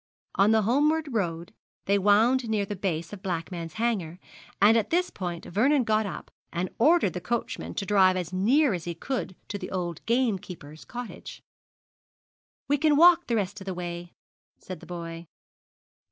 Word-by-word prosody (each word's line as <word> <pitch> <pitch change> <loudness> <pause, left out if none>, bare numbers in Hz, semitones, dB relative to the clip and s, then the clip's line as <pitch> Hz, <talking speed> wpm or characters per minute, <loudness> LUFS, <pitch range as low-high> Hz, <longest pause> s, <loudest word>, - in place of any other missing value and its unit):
On 195 +2 +4
the 220 -1 +4
homeward 295 +5 +1
road 170 -5 -2 0.3
they 200 +1 +2
wound 225 +5 +3
near 210 -2 0
the 205 +1 -5
base 175 -2 -3
of 200 - -8
Blackman's 170 -2 -4
Hanger, 210 -8 -1 0.4
and 210 +3 +6
at 225 -3 +1
this 360 +2 +1
point 175 -2 -5
Vernon 260 - +2
got 215 -1 +1
up 190 - -8 0.2
and 175 +2 -3
ordered 295 - +4
the 180 - -5
coachman 235 +6 -3
to 200 - -2
drive 190 -2 +4
as 180 0 -4
near 245 +8 +3
as 175 -3 -4
he 170 -1 -4
could 230 0 -4
to 205 - -5
the - - -6
old 175 -3 -4
gamekeeper's 190 - -2
cottage. 245 -2 -8 1.2
'We 290 0 +1
can 305 0 +4
walk 345 +2 +6
the 235 - 0
rest 200 -1 -2
of - - -9
the 190 -2 -4
way,' 175 0 -6 0.5
said 185 - -9
the - - -14
boy. 170 -1 -7
200 Hz, 170 wpm, -27 LUFS, 175-240 Hz, 1.2 s, and